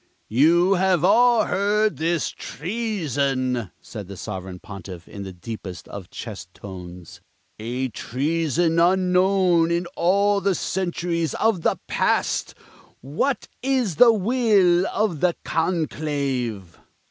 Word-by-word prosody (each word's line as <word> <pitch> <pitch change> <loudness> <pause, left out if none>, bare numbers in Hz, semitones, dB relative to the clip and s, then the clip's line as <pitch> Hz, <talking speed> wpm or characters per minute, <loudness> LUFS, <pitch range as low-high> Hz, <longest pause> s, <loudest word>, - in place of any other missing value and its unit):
"You 170 - +4
have 185 -3 +2
all 235 +3 +5
heard 210 +2 +1
this 165 -1 0
treason," 140 - -2
said 105 -5 -8
the 100 0 -9
Sovereign 95 -3 -6
Pontiff, 95 -3 -10
in 100 - -9
the 95 -1 -6
deepest 90 -2 -8
of 100 -3 -8
chest - - -8
tones 90 -3 -10 0.4
"a 125 +4 -2
treason 160 +7 0
unknown 180 -1 +3
in 170 +1 0
all 200 +3 +2
the 195 -1 +1
centuries 170 -3 -2
of 220 -5 +1
the - - +1
past! - - 0 0.5
What 160 - -1
is 250 - 0
the 240 -2 +8
will 205 -5 +3
of 200 -7 -1
the 180 +1 +2
conclave?" 140 - -2
165 Hz, 115 wpm, -23 LUFS, 120-190 Hz, 0.5 s, the